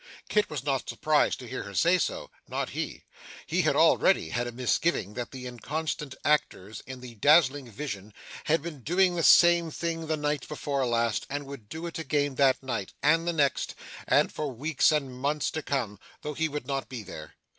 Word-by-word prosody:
Kit 210 0 +2
was 145 -5 -4
not 135 -3 -1
surprised 155 -1 +2
to 125 - -10
hear 130 - -4
her 100 -2 -9
say 175 - +4
so - - -3 0.2
not - - -3
he. - - -4 0.4
He - - +1
had - - +2
already 80 - +4
had 120 +7 -1
a - - -4
misgiving 125 - 0
that 120 0 -5
the 130 -2 -8
inconstant 145 +4 -4
actors 110 -8 0
in 130 -1 -8
that 120 -4 -11
dazzling 145 -4 +4
vision 105 -4 -6 0.3
had 155 0 +2
been 160 -5 -7
doing 180 +6 +3
the 170 - -1
same 170 0 +6
thing 165 0 -3
the 155 0 0
night 150 -2 -2
before 140 -3 -2
last, 115 -1 0
and 145 +1 -3
would 135 -7 -10
do 160 +2 -6
it 170 -1 -5
again 145 -2 0
that 135 0 +3
night, 105 -7 -4
and 165 +3 +3
the 175 - +1
next, 140 -4 +1 0.3
and - - +3
for 150 -2 -3
weeks 145 +6 +2
and 140 -4 -1
months 145 +2 0
to 155 - -3
come, 120 -9 -2 0.2
though 150 - -3
he 160 +2 0
would 150 -3 -5
not 135 0 -3
be 120 -4 -6
there. 80 -5 -10
140 Hz, 200 wpm, -28 LUFS, 125-155 Hz, 0.4 s, same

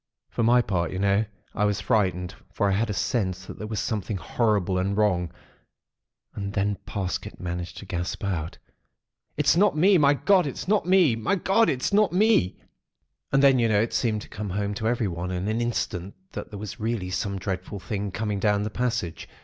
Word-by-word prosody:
"For - - -2
my 120 +2 +5
part, 85 -6 -1
you 95 - -4
know, 100 +2 +2 0.3
I 105 - +1
was 105 0 +1
frightened; 95 -2 0 0.2
for 100 - 0
I - - +2
had 110 +4 0
a - - 0
sense 95 -3 -1
that - - -9
there 105 - -5
was 110 -2 -3
something 105 -2 -2
horrible 100 -3 0
and 100 +2 -1
wrong. 90 -5 +1 1.0
And 100 -1 -5
then 100 0 0
Parsket 95 -4 -4
managed 90 -1 -5
to - - -8
gasp 90 -1 -4
out:— 85 -5 -3 0.8
"'It's 150 +1 +4
not 200 -2 +3
me! 185 +3 +5
My 145 -1 +5
God! 185 +1 +3
It's 140 - -5
not 205 -3 +2
me! 180 -10 +5
My 115 - 0
God! 195 +4 +3
It's 130 +9 -1
not 210 0 +4
me.' 185 - +3 0.7
"And 135 +1 +3
then, 135 -2 +6
you 115 -1 +3
know, 105 -2 +3
it 115 +2 0
seemed 110 -3 0
to - - -12
come 105 -1 -6
home 100 +2 -2
to 110 +2 -2
everyone 95 -7 -1
in 90 +1 -2
an 110 +2 0
instant 100 -5 -2 0.2
that - - -6
there 105 - -8
was 105 +3 -7
really 110 -4 -2
some 100 +1 -2
dreadful 95 +1 -4
thing 100 +3 -3
coming 105 +1 -2
down 105 0 +2
the 105 - -3
passage. 115 -9 -2
105 Hz, 200 wpm, -26 LUFS, 95-120 Hz, 1.0 s, then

